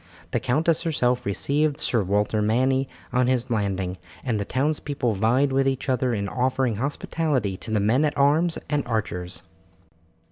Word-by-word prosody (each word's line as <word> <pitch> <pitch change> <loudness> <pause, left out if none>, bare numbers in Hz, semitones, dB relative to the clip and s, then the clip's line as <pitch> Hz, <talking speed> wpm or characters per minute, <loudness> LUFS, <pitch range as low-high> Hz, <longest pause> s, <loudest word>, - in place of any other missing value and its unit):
The 120 - +1
countess 155 +7 +1
herself 125 - 0
received 145 +8 +1
Sir 120 - +2
Walter 105 +2 +1
Manny 130 +5 +1 0.2
on 125 0 +3
his 125 -1 0
landing, 95 -4 -1 0.3
and 115 -5 -1
the 100 - -2
townspeople 140 -2 -1
vied 120 +8 +2
with 135 0 +2
each 135 0 -1
other 130 -1 +1
in 100 -3 -1
offering 125 -1 0
hospitality 140 - -1
to 110 - -9
the 110 -1 +1
men 115 +8 +2
at 150 -1 0
arms 155 +5 +3
and 145 -1 +1
archers. 90 -6 -3
125 Hz, 155 wpm, -24 LUFS, 105-140 Hz, 0.3 s, on